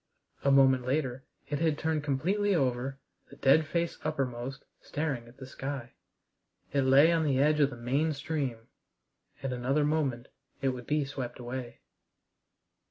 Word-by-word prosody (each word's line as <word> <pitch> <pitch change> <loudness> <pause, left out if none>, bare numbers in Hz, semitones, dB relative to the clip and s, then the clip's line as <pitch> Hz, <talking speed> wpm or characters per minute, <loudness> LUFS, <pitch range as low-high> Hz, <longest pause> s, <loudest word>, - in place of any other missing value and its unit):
A 140 - +3
moment 135 -2 +5
later 130 -1 -1 0.2
it 145 -1 -2
had 160 -2 +1
turned 155 -2 -1
completely 190 +9 +1
over, 135 -2 0 0.3
the - - -13
dead 150 +3 +4
face 170 +1 -1
uppermost, 135 -4 -3 0.2
staring 140 -6 -3
at 120 - -16
the 135 - -8
sky. 135 -2 -6 0.8
It 140 - +3
lay 135 +5 +6
on 165 -1 +2
the 140 -4 +2
edge 150 +2 +3
of 140 -2 +4
the 125 - -9
main 135 +7 +1
stream. 140 -6 -3 0.8
In 135 -1 -1
another 135 +4 +1
moment 140 -5 0 0.3
it 135 - +1
would 125 -2 -5
be 150 -1 +1
swept 130 -3 -5
away. 120 0 -6
135 Hz, 155 wpm, -30 LUFS, 125-150 Hz, 0.8 s, lay